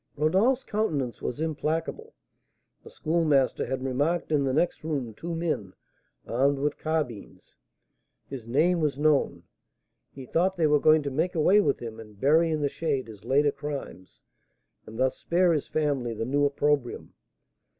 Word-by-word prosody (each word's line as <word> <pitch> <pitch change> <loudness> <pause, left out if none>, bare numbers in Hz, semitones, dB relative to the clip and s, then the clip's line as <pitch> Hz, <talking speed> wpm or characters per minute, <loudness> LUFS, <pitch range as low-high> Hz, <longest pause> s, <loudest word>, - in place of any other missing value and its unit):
Rodolph's 195 - +2
countenance 155 - -2
was 125 - -4
implacable. 160 - -3 0.7
The - - -12
Schoolmaster 155 -5 +1
had 130 +1 -3
remarked 145 +7 -1
in 145 -2 +2
the 135 - +1
next 155 +5 0
room 140 -8 -3
two 170 +9 -5
men, 155 - -3 0.5
armed 135 +4 +1
with 145 +2 -2
carbines. 155 -9 -4 0.7
His 125 -5 -8
name 165 +8 +2
was 150 -4 0
known; 150 -1 +1 0.7
he 135 -1 -10
thought 180 +8 0
they 165 - +2
were 150 -1 +4
going 155 +1 +4
to 140 - -3
make 165 +7 -1
away 185 +6 +5
with 140 -7 0
him 115 -2 -7
and 105 -2 -13
bury 160 +6 +4
in 155 -1 -1
the - - +3
shade 140 -4 -2
his 105 -2 -12
later 145 +2 +3
crimes, 140 -10 -8 0.6
and 110 - -9
thus 130 +1 +1
spare 175 0 +2
his 150 - -1
family 140 -7 -1
the 115 - -3
new 145 +3 +1
opprobrium. 145 -2 -1
145 Hz, 160 wpm, -27 LUFS, 130-160 Hz, 0.7 s, away